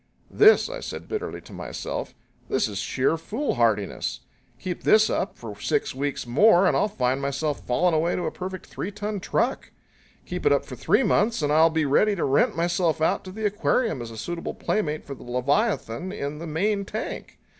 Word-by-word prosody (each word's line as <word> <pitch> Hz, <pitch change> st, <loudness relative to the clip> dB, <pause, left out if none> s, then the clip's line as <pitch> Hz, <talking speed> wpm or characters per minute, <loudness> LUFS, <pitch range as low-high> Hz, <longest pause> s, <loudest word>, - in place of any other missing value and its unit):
"This," 430 Hz, +1 st, +6 dB
I -, -, -6 dB
said -, -, -7 dB
bitterly 435 Hz, +1 st, -4 dB
to -, -, -14 dB
myself -, -, -5 dB, 0.3 s
"this 130 Hz, -, +1 dB
is 100 Hz, -2 st, -5 dB
sheer 130 Hz, +8 st, 0 dB
foolhardiness! 115 Hz, -, -1 dB, 0.4 s
Keep 180 Hz, -2 st, -4 dB
this 215 Hz, 0 st, +5 dB
up 195 Hz, -, -2 dB
for 110 Hz, -3 st, -8 dB
six -, -, 0 dB
weeks 140 Hz, 0 st, -3 dB
more 175 Hz, -, +5 dB
and -, -, +3 dB
I'll -, -, +3 dB
find 130 Hz, -8 st, -1 dB
myself 140 Hz, +2 st, -1 dB
fallen 170 Hz, +8 st, +2 dB
away 160 Hz, +2 st, +1 dB
to 180 Hz, -, -2 dB
a -, -, -1 dB
perfect 185 Hz, 0 st, -6 dB
three 190 Hz, -, -5 dB
ton 205 Hz, 0 st, -4 dB
truck. 235 Hz, +7 st, -1 dB, 0.6 s
Keep -, -, -2 dB
it -, -, +5 dB
up -, -, +1 dB
for -, -, -8 dB
three -, -, +2 dB
months 220 Hz, -6 st, +2 dB
and 145 Hz, 0 st, +2 dB
I'll 160 Hz, +2 st, +6 dB
be 160 Hz, -1 st, 0 dB
ready 205 Hz, +9 st, +3 dB
to 175 Hz, -, -1 dB
rent 135 Hz, +1 st, +2 dB
myself 170 Hz, -1 st, +1 dB
out 170 Hz, +5 st, +1 dB
to 185 Hz, -, -7 dB
the 215 Hz, +3 st, -4 dB
aquarium 210 Hz, -, +1 dB
as 115 Hz, -, -6 dB
a 115 Hz, -, -9 dB
suitable 170 Hz, +10 st, -4 dB
playmate 155 Hz, -7 st, -1 dB
for 140 Hz, -, -6 dB
the 135 Hz, -, -12 dB
leviathan 140 Hz, -, -1 dB
in 150 Hz, -6 st, -4 dB
the 170 Hz, -, -6 dB
main 200 Hz, +6 st, 0 dB
tank. 215 Hz, +3 st, -6 dB
170 Hz, 195 wpm, -25 LUFS, 140-205 Hz, 0.6 s, This